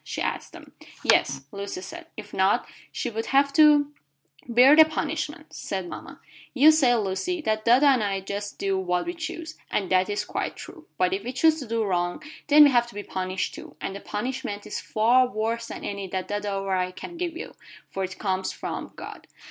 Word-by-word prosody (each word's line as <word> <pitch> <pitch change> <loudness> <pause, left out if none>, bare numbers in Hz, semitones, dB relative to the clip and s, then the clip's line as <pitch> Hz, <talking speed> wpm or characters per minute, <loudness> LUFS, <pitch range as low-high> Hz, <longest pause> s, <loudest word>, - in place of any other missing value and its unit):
she - - -6
asked - - -3
them. - - -13 0.3
"Yes," 135 0 +3
said - - -34
Lucy. 200 -2 -6 0.2
"If 210 -1 -9
not, 190 +1 +2 0.2
she 245 - -3
would 225 +1 -4
have 280 +1 +3
to 295 -1 +5 0.3
" 145 - -28
"Bear 265 +4 +8
the 315 - +10
punishment," 315 0 -4
said 190 -2 -4
mama. - - -9 0.4
"You 290 +4 +8
say, 270 -6 +4
Lucy, 220 - -1
that 215 -5 -1
dada 245 +5 +5
and 265 -5 +4
I 195 -1 -1
do 190 - -15
just 205 0 -5
what 190 -2 0
we 345 - -3
choose, 325 -1 -7
and 195 -3 -2
that 185 +1 +3
is 205 - -2
quite - - -3
true. 325 -3 -11
But 185 0 +2
if 195 +1 -2
we 245 - -4
choose 315 +4 +3
to 265 - -7
do 225 0 0
wrong, 175 - -1 0.2
then 300 +1 +8
we 285 - +6
have 240 -2 +3
to 240 - -14
be 205 - -5
punished 185 -1 -3
too, - - -11
and 195 - -4
the - - -6
punishment 215 0 -4
is - - -4
far 240 +4 +3
worse 230 +1 -2
than - - -7
any 200 -1 -4
that 185 0 -4
dada 205 -1 -2
or 195 0 -2
I 180 0 0
can 185 - -9
give 340 -1 -3
you, - - -7 0.4
for 195 - -3
it 185 0 -5
comes 190 -2 -1
from - - -6
God. - - -10
215 Hz, 210 wpm, -25 LUFS, 190-280 Hz, 0.4 s, the